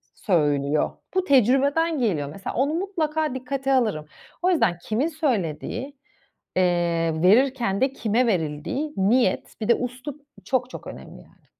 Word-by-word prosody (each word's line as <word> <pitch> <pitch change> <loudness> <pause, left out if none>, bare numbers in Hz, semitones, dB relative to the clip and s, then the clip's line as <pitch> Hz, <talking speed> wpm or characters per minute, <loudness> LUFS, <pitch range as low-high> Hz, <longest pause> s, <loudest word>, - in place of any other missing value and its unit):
söylüyor. 145 -5 +1 0.2
Bu 375 - +2
tecrübeden 280 - +3
geliyor 165 - 0
mesela. 195 +6 -6
Onu 280 +5 +1
mutlaka 315 -6 -1
dikkate 270 +1 -2
alırım. 215 -12 +1 0.4
O 360 - +2
yüzden 250 - +2
kimin 225 - 0
söylediği, 255 - -2 0.6
eee, 170 -3 +1
verirken 230 +1 +3
de 265 0 +2
kime 235 +1 +1
verildiği, 185 - -2
niyet, 200 +1 +1
bir 215 - -2
de 235 - +4
üslup 255 +4 -6 0.2
çok 255 +2 0
çok - - -9
önemli, - - -10
yani. - - -24
245 Hz, 135 wpm, -24 LUFS, 180-280 Hz, 0.6 s, de